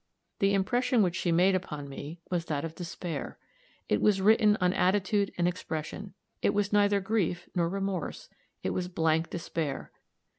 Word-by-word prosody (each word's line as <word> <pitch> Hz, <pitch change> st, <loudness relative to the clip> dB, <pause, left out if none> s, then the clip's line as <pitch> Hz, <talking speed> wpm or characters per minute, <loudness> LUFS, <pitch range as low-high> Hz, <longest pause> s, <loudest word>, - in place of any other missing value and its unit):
The 200 Hz, 0 st, +3 dB
impression 240 Hz, +4 st, +2 dB
which 180 Hz, -2 st, 0 dB
she 175 Hz, -, 0 dB
made 180 Hz, +3 st, +4 dB
upon 150 Hz, -6 st, -3 dB
me 145 Hz, +4 st, -8 dB
was 175 Hz, -2 st, 0 dB
that 150 Hz, -1 st, -2 dB
of 160 Hz, -, -6 dB
despair. 175 Hz, 0 st, -5 dB, 0.5 s
It -, -, +1 dB
was 205 Hz, -2 st, +4 dB
written 210 Hz, +1 st, +5 dB
on 180 Hz, 0 st, +2 dB
attitude 200 Hz, +2 st, +2 dB
and 175 Hz, 0 st, +2 dB
expression. 180 Hz, +2 st, -4 dB, 0.3 s
It -, -, +2 dB
was 205 Hz, 0 st, 0 dB
neither 205 Hz, -1 st, +4 dB
grief 190 Hz, -3 st, -1 dB
nor 170 Hz, -2 st, +1 dB
remorse 195 Hz, -2 st, -3 dB, 0.4 s
it -, -, 0 dB
was 180 Hz, -1 st, -2 dB
blank 160 Hz, -2 st, +1 dB
despair. 165 Hz, -4 st, -4 dB
185 Hz, 160 wpm, -29 LUFS, 165-200 Hz, 0.5 s, written